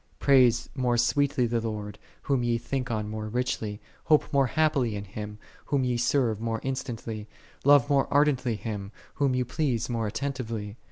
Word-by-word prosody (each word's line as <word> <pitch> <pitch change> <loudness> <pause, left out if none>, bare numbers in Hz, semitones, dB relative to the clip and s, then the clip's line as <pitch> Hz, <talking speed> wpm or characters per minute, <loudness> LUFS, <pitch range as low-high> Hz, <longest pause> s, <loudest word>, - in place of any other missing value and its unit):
Praise 125 -4 +4
more 125 -3 +1
sweetly 130 +1 +2
the 115 0 0
Lord, 105 -2 -5 0.2
Whom 135 -3 +1
ye 120 -1 +1
think 125 +2 -3
on 110 -2 -2
more 110 0 -5
richly: 110 -3 -2 0.3
hope 155 0 +3
more 135 -2 +4
happily 135 -4 +1
in 100 - -4
Him, 105 +1 -7 0.3
Whom 140 -2 +1
ye 125 -1 +1
serve 120 -2 +1
more 115 -1 -1
instantly: 115 -5 -4 0.4
love 140 -2 +6
more 140 -2 +2
ardently 140 -5 +2
Him, 105 -2 -5 0.3
whom 140 -3 +2
ye 125 - +1
please 125 -3 -1
more 115 -2 -1
attentive 130 +1 -3
ly. 105 -2 -5
120 Hz, 170 wpm, -27 LUFS, 110-135 Hz, 0.4 s, love